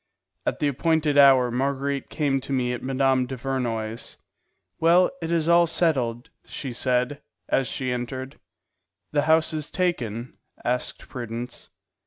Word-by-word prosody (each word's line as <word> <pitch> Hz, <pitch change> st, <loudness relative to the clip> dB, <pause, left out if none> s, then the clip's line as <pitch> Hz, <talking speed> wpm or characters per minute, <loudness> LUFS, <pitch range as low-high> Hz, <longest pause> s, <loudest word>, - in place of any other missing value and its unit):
At -, -, 0 dB
the 150 Hz, -, +1 dB
appointed 155 Hz, +1 st, +1 dB
hour 135 Hz, -3 st, +6 dB
Marguerite 140 Hz, +2 st, -1 dB
came 140 Hz, -4 st, 0 dB
to 135 Hz, -, -8 dB
me 125 Hz, -2 st, 0 dB
at 120 Hz, -, -5 dB
Mme. 130 Hz, -1 st, +2 dB
Duvernoy's. 120 Hz, -4 st, -3 dB, 0.6 s
"Well, 175 Hz, +3 st, +5 dB
it 165 Hz, -, -3 dB
is 165 Hz, -2 st, +1 dB
all 170 Hz, 0 st, +5 dB
settled," 130 Hz, -6 st, 0 dB
she 130 Hz, -4 st, -6 dB
said, 125 Hz, +3 st, 0 dB, 0.3 s
as 135 Hz, -, +1 dB
she 130 Hz, -1 st, -2 dB
entered. 130 Hz, +2 st, -5 dB, 0.7 s
"The 145 Hz, -, +2 dB
house 160 Hz, 0 st, +4 dB
is 155 Hz, -1 st, -3 dB
taken?" 125 Hz, -, -2 dB, 0.3 s
asked 125 Hz, +1 st, -2 dB
Prudence. 120 Hz, 0 st, -6 dB
135 Hz, 135 wpm, -25 LUFS, 125-150 Hz, 0.7 s, hour